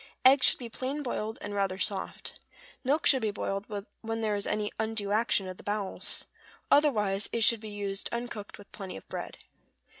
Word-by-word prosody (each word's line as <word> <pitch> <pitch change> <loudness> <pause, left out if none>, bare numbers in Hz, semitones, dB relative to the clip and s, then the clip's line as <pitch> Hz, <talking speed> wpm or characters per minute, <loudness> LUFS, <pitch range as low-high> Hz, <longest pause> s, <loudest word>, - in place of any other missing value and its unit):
Eggs 265 +1 +8
should - - +5
be 245 - -6
plain 265 +5 -3
boiled, 220 -3 -2
and 205 - -4
rather 195 -2 +1
soft. 195 -1 -3 0.4
Milk 280 +5 +2
should 265 -2 +7
be 220 - +1
boiled 200 0 -2 0.3
when 225 0 -2
there 215 -2 +1
is 205 - -2
any 210 -1 0
undue 220 -2 -1
action 210 -3 +2
of 185 -1 -6
the - - -12
bowels; 205 -1 -1 0.5
otherwise 210 -9 +4
it 230 - +1
should 230 +1 +5
be 215 0 -7
used 200 -1 -2
uncooked 235 -3 -4
with 205 - -14
plenty 195 - -6
of - - -12
bread. - - -5
210 Hz, 185 wpm, -30 LUFS, 200-235 Hz, 0.5 s, Eggs